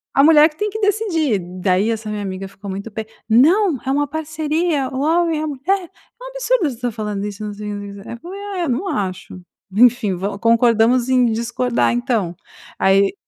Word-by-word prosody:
a 275 - +5
mulher 310 0 +7
que 305 - -22
tem 420 +4 -1
que 435 +2 -5
decidir, 375 - +1 0.2
daí 190 +3 +2
essa 220 -1 -3
minha 210 -1 -3
amiga 195 -1 -5
ficou 195 +1 -10
muito 200 +3 -6
p 220 +1 -5 0.2
"Não, 315 - +4
é - - -4
uma 290 +1 +1
parceria, 310 -1 -1
o 260 - -4
homem 325 +1 +1
e 310 - -2
a - - -2
mulher, 340 +6 -1
é 460 +5 -21
um - - -7
absurdo - - 0
você 245 -3 -8
tá 245 -1 -2
falando 210 -2 -4
isso" 210 0 -6
não 210 - -4
sei, 210 0 -6
não 205 - -5
sei, 200 0 -8
não 200 -1 -11
sei - - -8
o 235 - -7
que, 335 - -13
eu - - -7
falei: 395 - -7
"Ah - - -4
é, - - 0
eu - - -2
não 275 +11 -1
acho, 185 - -4 0.3
enfim, 235 -3 +4
vol 200 +3 -4
concordamos 230 +2 +3
em 255 -1 +4
discordar, 235 +2 0
então". 235 -8 -1 0.4
Aí 195 0 +3
245 Hz, 230 wpm, -19 LUFS, 210-315 Hz, 0.4 s, mulher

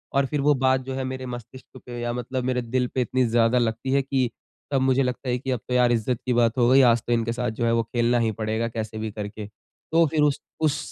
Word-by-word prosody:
और 140 0 +3
फिर 145 +1 -2
वो 150 +1 +4
बात 130 0 +3
जो 130 +1 -5
है 135 - -2
मेरे 130 0 -5
मस्तिष्क 125 +1 -9
पे 120 -1 -7
या 120 0 -2
मतलब 125 +1 -3
मेरे 125 -1 0
दिल 125 +1 -1
पे 130 - +2
इतनी 130 +1 +1
ज़्यादा 115 +1 +3
लगती 120 +2 -1
है 140 - +3
कि 135 -2 0 0.4
तब 135 -2 +2
मुझे 130 +1 +3
लगता 125 +1 -3
है 125 - +1
कि 135 +1 -3
अब 125 - -1
तो 125 - -3
यार! 125 -1 +4
इज़्ज़त 115 +1 0
की 125 - +1
बात 120 -1 +2
हो 120 -1 +4
गई। 135 +1 +6
आज 120 -2 +4
तो 120 - +2
इनके 115 0 0
साथ 125 0 -2
जो - - +2
है 115 - +2
वो 115 - +2
खेलना 120 +1 +1
ही 115 -1 +1
पड़ेगा 110 +1 -2
कैसे 110 -1 -5
भी 110 -1 -4
करके। 105 0 -6 0.4
तो 165 0 +5
फिर 150 +1 0
उस 145 -1 +1 0.2
उस 155 -3 +1
125 Hz, 270 wpm, -24 LUFS, 115-130 Hz, 0.4 s, गई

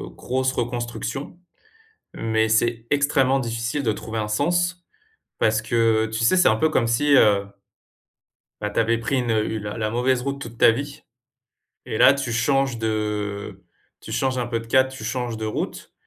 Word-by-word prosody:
grosse 130 +1 -1
reconstruction. 120 +6 -4 0.8
Mais, 110 0 0
c'est 115 +1 +1
extrêmement 135 -2 +2
difficile 120 +3 -2
de 110 -4 +1
trouver 110 +1 -6
un 105 -1 -2
sens. 175 +9 0 0.6
Parce 110 0 +2
que, 110 -1 +2
tu 110 0 -4
sais, 185 +11 +4
c'est 180 - +5
un 110 - +4
peu 160 +8 +2
comme 120 -6 +1
si, 140 +5 +2
heu 100 -4 +4 1.2
bah, 105 - -2
tu - - -1
avais 115 +1 +2
pris 125 +4 -1
une 120 -2 0 0.2
la 105 0 -6
la 110 -1 -1
mauvaise 125 +2 +1
route 140 +1 -4
toute 115 -1 -8
ta 115 - +6
vie. 145 +4 -5 0.9
Et - - -3
là, 135 - +7
tu 135 -4 -3
changes 135 +1 +1
de 105 -3 -3 0.4
tu - - -9
changes 130 -1 0
un 120 - -1
peu 115 -1 -2
de 115 - -12
cap, 130 +2 +3
tu 130 - -9
changes 125 -3 -3
de 110 0 -4
route, 110 - -5
120 Hz, 175 wpm, -23 LUFS, 110-135 Hz, 1.2 s, là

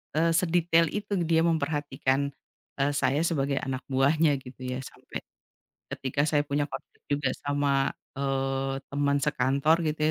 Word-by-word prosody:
eee, 165 +2 +3
sedetail 170 -1 +3
itu 205 0 -4 0.2
dia 165 0 +4
memperhatikan, 145 -4 0 0.5
eee, 140 +1 +2
saya 135 +1 +2
sebagai 140 -4 0
anak 135 -1 -4
buahnya, 140 +2 +3
gitu 130 0 -13
ya. 125 - -3
Sampai 130 - -8 0.7
ketika 135 +2 -3
saya 145 -1 +3
punya 145 0 -1
konflik - - -9
juga 145 -1 +1
sama, 145 -1 +1 0.3
eee, 135 0 -1 0.2
teman 140 0 +2
sekantor, 140 +2 +3
gitu 150 0 -3
140 Hz, 135 wpm, -28 LUFS, 135-155 Hz, 0.7 s, dia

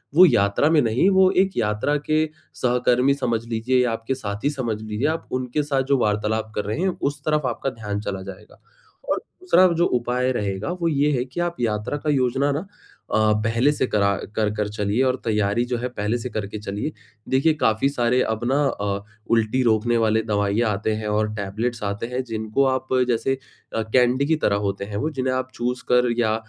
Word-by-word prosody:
वो 180 +3 +9
यात्रा 120 - +3
में 160 -2 +4
नहीं, 120 - +2
वो 190 -1 +5
एक 190 +1 +1
यात्रा 105 +8 +1
के 155 0 +3 0.4
सहकर्मी 125 +2 +3
समझ 120 -5 -1
लीजिए 120 +3 +1
या 120 - +1
आपके 115 +3 -2
साथी 110 +2 -3
समझ 120 -7 -3
लीजिए, 110 +6 -2
आप 160 +1 -2
उनके 130 +3 -1
साथ 140 -2 0
जो 140 - +5
वार्तालाप 110 0 0
कर 105 - -2
रहे 105 +8 -3
हैं, 190 -1 0
उस 145 +1 -2
तरफ 150 -2 +1
आपका 125 +2 -1
ध्यान 105 -4 -4
चला 95 -2 -4
जाएगा। 95 +2 -11 0.5
और - - +2
दूसरा 350 - +2
जो 175 - +3
उपाय 125 +1 0
रहेगा 100 - -2
वो 170 - +2
ये 150 -1 +2
है 125 -3 0
कि 130 +6 -7
आप 175 0 -1
यात्रा 110 +4 -1
का 150 - -3
योजना 135 +1 +2
ना 155 +8 -3 0.5
अ, 110 0 +4
पहले 115 +6 +2
से 140 -3 0
करा 100 -1 +2 0.2
कर 110 -1 +1
कर 105 -1 -1
चलिए 105 +3 -1
और 130 -1 +2
तैयारी 105 0 +1
जो 125 0 -2
है 125 +2 -2
पहले 110 0 -2
से 125 +2 -5
करके 105 -1 -4
चलिए। 105 +8 -4 0.4
देखिए 140 +5 +3
काफ़ी 110 +4 +3
सारे 125 -2 +1
अब 110 - -1
अपना 120 +4 -1
अ, 100 -4 -2 0.3
उल्टी 115 +3 +2
रोकने 115 0 +2
वाले 110 0 +2
दवाइयाँ 105 +1 +1
आते 110 +2 -1
हैं 110 -1 -4
और 105 +1 +1
टेबलेट्स 110 +3 -3
आते 100 +3 -2
हैं 125 +1 -3
जिनको 110 +2 -1
आप 130 0 0 0.2
जैसे 120 +2 +1 0.4
अ, 115 - +1
कैंडी 125 +4 +2
की 160 +2 +2
तरह 100 - +3
होते 100 0 -3
हैं 100 0 -5
वो 155 +8 -1
जिन्हें 130 -3 -1
आप 130 0 -2
चूसकर 125 0 +1
या 110 -2 +2
120 Hz, 200 wpm, -23 LUFS, 105-135 Hz, 0.5 s, वो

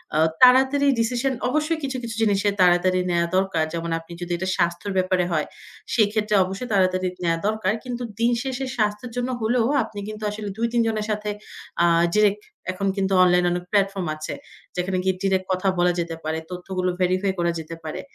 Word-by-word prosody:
আ - - +2 0.2
তাড়াতাড়ি 265 +3 +6
ডিসিশন 245 +3 0 0.2
অবশ্যই 310 +3 0
কিছু, 265 -1 -2
কিছু 230 -2 -5
জিনিসে 205 -1 +2
তাড়াতাড়ি 180 +1 +4
নেয়া 170 0 +2
দরকার। 190 -4 +1
যেমন 170 0 -3
আপনি 165 +1 -16
যদি 175 0 -5
এটা 190 +2 -3
স্বাস্থ্যের 175 +3 -1
ব্যাপারে 185 -1 +2
হয়, 155 -2 +1 0.5
সেক্ষেত্রে 210 -1 +2
অবশ্যই 195 +6 -5
তাড়াতাড়ি 185 -1 +2 0.2
নেয়া 165 -1 +2
দরকার। 215 -2 0
কিন্তু 245 -1 -5 0.2
দিন 235 +1 +3
শেষে 265 0 -3
স্বাস্থ্যের 210 +2 -1
জন্য 245 +1 -1
হলেও 225 +1 +2 0.2
আপনি 215 -2 -8
কিন্তু 215 0 -7
আসলে 210 0 -5
২-৩ 235 +1 +1
জনের 215 -1 -1
সাথে 210 0 -2 0.5
আ - - +6 0.3
ডিরেক্ট 210 0 +3 0.3
এখন 195 +2 -2
কিন্তু 195 0 0
অনলাইনে 180 0 +4
অনেক 175 0 -2
প্ল্যাটফর্ম 195 -3 +1
আছে। 155 0 -5 0.4
যেখানে 185 +1 -1
গিয়ে 190 0 +1
ডিরেক্ট 190 -1 +1
কথা 185 +1 -1
বলা 175 0 +4
যেতে 170 -1 -3
পারে, 160 +1 -2
তথ্যগুলো 185 0 -3
ভেরিফাই 185 +2 +2
করা 170 0 +2
যেতে 160 +1 -7
পারে। 155 -1 -5
195 Hz, 180 wpm, -23 LUFS, 180-225 Hz, 0.5 s, তাড়াতাড়ি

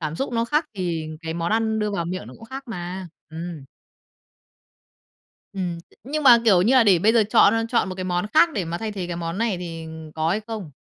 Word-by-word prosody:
cảm 155 0 -3
xúc 270 - -3
nó 230 0 +1
khác 300 +6 +1
thì 170 -4 -3
cái 160 0 -5
món 170 +4 -1
ăn 220 -1 +1
đưa 210 0 0
vào 175 -4 -2
miệng 180 +2 -5
nó - - -11
cũng 225 - -13
khác 265 +4 -7
mà. 180 -2 -5 0.2
Ừm. 165 -3 -7 1.9
Ừm, 180 -3 -3
t - - -27
nhưng 300 +4 -2
mà, 245 -4 +8
kiểu 190 -5 +5
như 235 +7 +3
là, 255 - +6
để 195 -5 +5
bây 215 +6 +3
giờ 230 -2 +5
chọn, 225 -2 +6
ơ, 225 0 +1
chọn 230 -5 +1
một 185 - -5
cái 185 - -5
món 180 +1 -1
khác 315 +2 +7
để 195 -6 -2
mà 170 +1 -4
thay 220 -1 -4
thế 190 -3 -4
cái 175 -1 -4
món 170 +3 -4
này 230 -4 0
thì, 165 -2 -6
ừm, 160 -1 -9
có 160 +1 -1
hay 205 - 0
không? 215 -8 -6
185 Hz, 250 wpm, -23 LUFS, 170-225 Hz, 1.9 s, mà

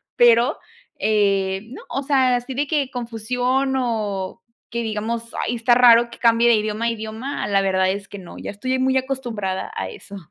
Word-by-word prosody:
pero, 240 0 +4 0.4
eh, 195 -3 +1
no, - - -9
o 275 +2 -3
sea, 260 -3 +3
así 245 +2 -4
de 285 +2 -1
que 285 -4 0
confusión 250 +3 -1
o 210 -6 -2 0.3
que 235 0 -3
digamos, 225 +2 -4
ay, 245 - -1
está 240 +1 +3
raro 240 -1 +6
que - - -11
cambie 235 0 +4
de 235 - +6
idioma 215 +1 -1
a - - +2
idioma, 225 +5 -5
la 200 -1 +2
verdad 190 -1 +2
es 195 +1 -3
que 205 - -8
no, 180 - -11
ya - - -6
estoy 255 +6 -2
muy 260 0 +2
acostumbrada 240 -8 -3
a - - -3
eso. 205 - -10
235 Hz, 185 wpm, -21 LUFS, 210-255 Hz, 0.4 s, raro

